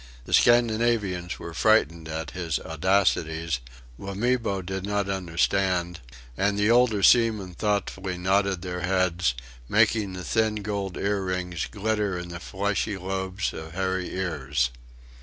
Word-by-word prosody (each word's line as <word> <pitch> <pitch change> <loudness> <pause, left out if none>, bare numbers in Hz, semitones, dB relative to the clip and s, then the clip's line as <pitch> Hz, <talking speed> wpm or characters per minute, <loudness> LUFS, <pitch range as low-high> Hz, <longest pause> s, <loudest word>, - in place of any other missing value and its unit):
The - - -5
Scandinavians 110 -6 +3
were 85 - -8
frightened 85 -5 +2
at 80 -1 -4
his 85 -4 -2
audacities; 80 -4 +1 0.4
Wamibo 100 0 -1
did 95 +1 -4
not 100 0 -1
understand; 90 -1 0 0.4
and 100 +5 +1
the 105 +2 +3
older 115 -4 +4
seamen 110 -6 +4
thoughtfully 95 -2 -2
nodded 95 0 +1
their 90 -1 -4
heads 90 -6 +1 0.3
making 105 -4 +3
the 90 0 -6
thin 110 0 0
gold 100 -3 -3
earrings 90 -4 -2
glitter 105 -2 -1
in 90 0 -6
the 85 0 -6
fleshy 100 +3 -2
lobes 95 +1 -3
of 80 0 -8
hairy 95 0 -1
ears. 75 -8 -1
95 Hz, 125 wpm, -26 LUFS, 90-105 Hz, 0.4 s, older